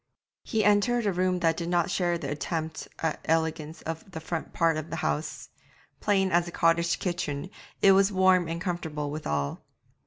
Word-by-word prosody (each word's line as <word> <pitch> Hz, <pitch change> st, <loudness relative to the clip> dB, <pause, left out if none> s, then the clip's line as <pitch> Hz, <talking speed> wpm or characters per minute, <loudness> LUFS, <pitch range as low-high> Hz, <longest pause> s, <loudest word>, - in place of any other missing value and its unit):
He 220 Hz, -3 st, 0 dB
entered 210 Hz, +3 st, +3 dB
a 200 Hz, -, +2 dB
room 180 Hz, 0 st, +1 dB
that 165 Hz, -2 st, +3 dB
did 170 Hz, 0 st, -4 dB
not 175 Hz, -1 st, +1 dB
share 175 Hz, -2 st, +1 dB
the 145 Hz, -4 st, -5 dB
attempt 160 Hz, +2 st, -3 dB, 0.2 s
at 160 Hz, -, 0 dB
elegance 160 Hz, -1 st, -1 dB
of 165 Hz, +4 st, -6 dB
the 160 Hz, -, -6 dB
front 160 Hz, 0 st, -4 dB
part 165 Hz, -1 st, +2 dB
of 155 Hz, +1 st, -4 dB
the -, -, -4 dB
house; 155 Hz, -1 st, -3 dB, 0.5 s
plain 195 Hz, -2 st, +2 dB
as 175 Hz, 0 st, +3 dB
a -, -, -6 dB
cottage 170 Hz, 0 st, +2 dB
kitchen, 175 Hz, -2 st, -3 dB, 0.3 s
it 195 Hz, -, +8 dB
was 195 Hz, +1 st, +5 dB
warm 185 Hz, -2 st, +4 dB
and 165 Hz, +1 st, -3 dB
comfortable 160 Hz, -5 st, -3 dB
withal. 75 Hz, -, -2 dB
170 Hz, 180 wpm, -28 LUFS, 160-185 Hz, 0.5 s, it